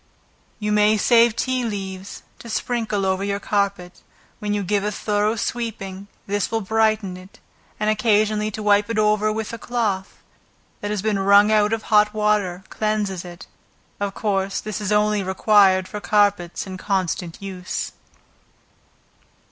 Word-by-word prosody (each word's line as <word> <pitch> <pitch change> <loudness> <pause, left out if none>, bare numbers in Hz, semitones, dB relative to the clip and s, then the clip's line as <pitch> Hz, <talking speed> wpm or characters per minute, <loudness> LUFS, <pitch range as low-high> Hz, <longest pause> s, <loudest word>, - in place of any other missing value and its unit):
You 210 -1 -2
may 210 +1 +4
save 230 0 +4
tea 255 0 -1
leaves, 195 -3 -5 0.2
to 235 - -10
sprinkle 220 -4 -1
over 190 0 0
your 200 0 -1
carpet, 200 -3 -2 0.4
when 210 -1 -3
you 205 -1 0
give 200 +1 0
a 210 - -1
thorough 210 +1 0
sweeping, 200 -5 -4 0.2
this 205 0 -1
will 225 0 -1
brighten 215 -2 +1
it, 185 +2 -15 0.4
and 210 - -1
occasionally 215 -1 +2
to 215 0 -6
wipe 205 0 +3
it 230 - -2
over, 215 0 +2
with 220 +1 -4
a 230 - -6
cloth, 210 -6 -2 0.6
that 205 - -4
has 210 -2 -2
been 215 -2 0
wrung 200 +2 +5
out 210 -1 +3
of 225 -1 -1
hot 210 0 +3
water 210 -4 0
cleanses 210 -4 -2
it, 175 -1 -10 0.5
of 200 -1 -3
course, 195 -2 -1
this 215 0 -5
is 205 -1 -2
only 210 0 +2
required 190 0 +3
for 210 - -7
carpets 205 -5 +1
in 190 -1 -7
constant 180 -4 -2
use. 185 -2 -5
210 Hz, 155 wpm, -22 LUFS, 195-215 Hz, 0.6 s, wrung